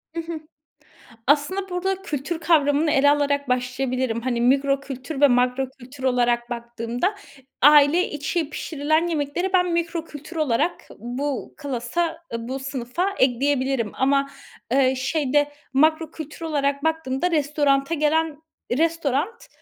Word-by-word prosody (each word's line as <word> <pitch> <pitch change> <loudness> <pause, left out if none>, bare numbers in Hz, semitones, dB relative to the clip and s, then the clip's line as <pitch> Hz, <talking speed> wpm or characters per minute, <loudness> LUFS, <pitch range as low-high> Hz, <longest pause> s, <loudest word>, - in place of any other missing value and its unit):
Hı 335 - -1
hı. 330 -1 -6 0.9
Aslında 305 +8 +1
burada 380 +1 -2
kültür 310 -1 -3
kavramını 305 -2 +3
ele 285 +1 +5
alarak 285 -1 +1
başlayabilirim. 250 -1 -1
Hani, 240 -1 -1
mikro 275 +3 +3
kültür 270 +1 -6
ve 290 - +7
makro 250 +1 +2
kültür 260 +1 -11
olarak 240 -1 +1
baktığımda 235 - -2 0.5
aile 295 +4 +6
içi 295 +1 -2
pişirilen 310 +2 0
yemekleri 330 +3 -1
ben 360 -2 +3
mikro 335 -1 -1
kültür 300 +2 -10
olarak 305 +2 0
bu 255 +5 -4
klasa, 285 +4 -2 0.2
ııı, 230 +1 -4
bu 265 - -3
sınıfa 270 +8 -3
ekleyebilirim 260 -2 +1
ama, 275 +1 +2 0.4
ııı, 265 -1 +3
şeyde 290 +1 +1 0.2
makro 315 +3 +3
kültür 310 -1 -9
olarak 285 -1 0
baktığımda 320 0 0
restorana 290 -1 +1
gelen 310 0 +1 0.4
restoran, 330 - -1
285 Hz, 125 wpm, -23 LUFS, 260-320 Hz, 0.9 s, ve